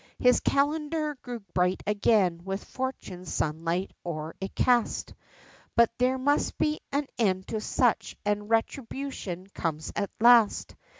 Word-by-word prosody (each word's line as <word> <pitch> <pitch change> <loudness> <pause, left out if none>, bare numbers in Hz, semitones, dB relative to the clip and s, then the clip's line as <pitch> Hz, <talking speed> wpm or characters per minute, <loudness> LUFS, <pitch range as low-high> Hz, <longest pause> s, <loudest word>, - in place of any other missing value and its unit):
His 250 0 +5
calender 300 +2 0
grew 240 -2 -6
bright 180 +1 +1
again 200 -4 +2
with 195 +1 -4
fortune's 195 -9 -5
sunlight 165 +4 -1
o'er 155 -2 -5
it 195 - -5
cast, 245 -2 +2 0.6
But 235 -1 +5
there 255 +1 +3
must 285 +3 +1
be 305 0 +1
an 285 +1 0
end 190 -4 +1
to 220 -1 -2
such, 245 +1 +1
and 205 0 -1
retribution 225 -5 -2
comes 155 -2 -3
at 200 -1 -1
last. 235 -2 +5
220 Hz, 130 wpm, -28 LUFS, 185-260 Hz, 0.6 s, His